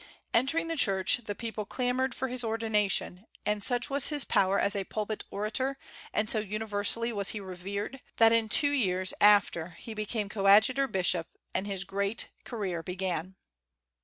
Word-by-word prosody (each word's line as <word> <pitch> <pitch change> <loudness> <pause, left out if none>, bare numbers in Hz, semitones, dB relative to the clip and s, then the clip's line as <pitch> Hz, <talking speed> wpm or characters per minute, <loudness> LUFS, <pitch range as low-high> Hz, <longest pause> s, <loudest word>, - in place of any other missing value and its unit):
Entering 280 +8 +1
the 330 - -2
church, 195 -3 +2
the 205 - -4
people 225 -1 -5
clamored 250 +3 -1
for 265 - -2
his 250 -1 -4
ordination; 220 -3 0 0.2
and 210 -1 0
such 245 +2 +2
was 280 -1 +2
his 295 -4 +2
power 195 +1 +2
as 200 - 0
a 200 - -1
pulpit 215 +1 -4
orator, 240 +7 -2 0.3
and 215 +1 0
so 220 - +4
universally 215 +2 0
was 200 -2 +4
he 215 - +1
revered, 200 +6 -6 0.2
that 225 0 +6
in 230 -1 +2
two 285 +6 +4
years 185 -9 0
after 185 -5 +3
he 225 - -9
became 215 0 -3
coadjutor 215 +7 +4
bishop, 180 -5 +1 0.3
and 200 - -2
his 195 -2 -2
great 200 +3 -2 0.2
career 195 -8 -4
began. 180 0 -4
210 Hz, 160 wpm, -29 LUFS, 195-235 Hz, 0.3 s, that